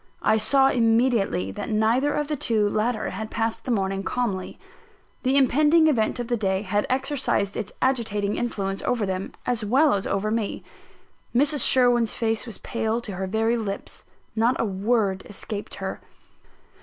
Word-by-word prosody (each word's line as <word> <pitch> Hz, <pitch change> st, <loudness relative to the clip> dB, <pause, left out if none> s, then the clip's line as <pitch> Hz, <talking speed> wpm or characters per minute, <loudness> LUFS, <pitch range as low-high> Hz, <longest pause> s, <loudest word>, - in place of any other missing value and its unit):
I 220 Hz, -, +4 dB
saw 270 Hz, +4 st, +4 dB
immediately 225 Hz, -, +2 dB
that 100 Hz, -, -6 dB
neither 230 Hz, +6 st, +2 dB
of 295 Hz, -1 st, -1 dB
the 300 Hz, -, -1 dB
two 220 Hz, -6 st, +1 dB
latter 215 Hz, +2 st, -1 dB
had 220 Hz, -1 st, -5 dB
passed 225 Hz, 0 st, -2 dB
the -, -, -5 dB
morning 195 Hz, -4 st, 0 dB
calmly. 200 Hz, -4 st, -3 dB, 0.6 s
The 265 Hz, +1 st, +2 dB
impending 300 Hz, +5 st, +4 dB
event 245 Hz, -7 st, +1 dB
of 240 Hz, -, -3 dB
the 240 Hz, -, 0 dB
day 195 Hz, -3 st, -1 dB
had 205 Hz, +1 st, -1 dB
exercised 260 Hz, -6 st, 0 dB
its 200 Hz, -, -4 dB
agitating 215 Hz, -6 st, 0 dB
influence 195 Hz, -5 st, -2 dB
over 235 Hz, -4 st, 0 dB
them, 190 Hz, 0 st, -3 dB
as 240 Hz, -3 st, -1 dB
well 270 Hz, +8 st, +3 dB
as 195 Hz, -1 st, -1 dB
over 210 Hz, +2 st, -1 dB
me. 220 Hz, -2 st, -2 dB, 0.7 s
Mrs. 290 Hz, +1 st, +4 dB
Sherwin's 245 Hz, -3 st, +3 dB
face 225 Hz, +1 st, -1 dB
was 225 Hz, -, -8 dB
pale 225 Hz, 0 st, -2 dB
to 230 Hz, -3 st, -7 dB
her 190 Hz, 0 st, -4 dB
very 225 Hz, +4 st, +1 dB
lips: 200 Hz, -3 st, -5 dB, 0.3 s
not 230 Hz, +3 st, +2 dB
a -, -, +1 dB
word 200 Hz, -1 st, 0 dB
escaped 205 Hz, +1 st, -6 dB
her. -, -, -5 dB
225 Hz, 165 wpm, -24 LUFS, 205-250 Hz, 0.7 s, I